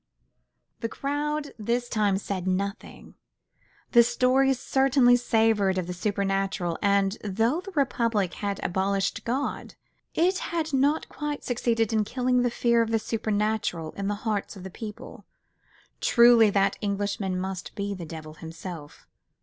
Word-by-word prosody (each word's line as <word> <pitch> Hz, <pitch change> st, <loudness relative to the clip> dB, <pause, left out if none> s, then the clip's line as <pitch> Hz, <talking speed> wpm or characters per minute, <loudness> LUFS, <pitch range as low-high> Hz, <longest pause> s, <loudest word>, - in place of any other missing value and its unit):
The 230 Hz, -, -3 dB
crowd 290 Hz, +2 st, -2 dB
this 235 Hz, +3 st, -1 dB
time 210 Hz, -4 st, +1 dB
said 190 Hz, -2 st, -4 dB
nothing: 195 Hz, +2 st, -3 dB, 0.8 s
the 235 Hz, -, +8 dB
story 255 Hz, +3 st, +3 dB
certainly 265 Hz, -1 st, +3 dB
savoured 220 Hz, -5 st, +2 dB
of 185 Hz, -, -1 dB
the 180 Hz, -, -5 dB
supernatural, 195 Hz, -3 st, -1 dB
and 200 Hz, 0 st, +2 dB
though 225 Hz, -, 0 dB
the 395 Hz, -, -9 dB
Republic 230 Hz, -, +1 dB
had 200 Hz, -1 st, -3 dB
abolished 195 Hz, +3 st, 0 dB
God, 260 Hz, +5 st, -3 dB, 0.4 s
it 365 Hz, +3 st, +2 dB
had 320 Hz, -3 st, -3 dB
not 280 Hz, +4 st, +2 dB
quite 295 Hz, -1 st, -5 dB
succeeded 230 Hz, -2 st, 0 dB
in 215 Hz, -1 st, +3 dB
killing 250 Hz, +3 st, +1 dB
the 245 Hz, -, +2 dB
fear 235 Hz, 0 st, +2 dB
of 225 Hz, -, 0 dB
the 225 Hz, -, +2 dB
supernatural 215 Hz, -6 st, -1 dB
in 200 Hz, 0 st, -4 dB
the 205 Hz, -, 0 dB
hearts 210 Hz, -1 st, -2 dB
of 190 Hz, -, -10 dB
the 190 Hz, -, -7 dB
people. 210 Hz, +2 st, -9 dB, 0.7 s
Truly 235 Hz, -2 st, +6 dB
that 195 Hz, -1 st, +1 dB
Englishman 200 Hz, -2 st, -2 dB
must 190 Hz, -1 st, -5 dB
be 200 Hz, -1 st, -3 dB
the 185 Hz, -3 st, -7 dB
devil 155 Hz, -1 st, -8 dB
himself. 165 Hz, -1 st, -9 dB
215 Hz, 140 wpm, -26 LUFS, 195-245 Hz, 0.8 s, the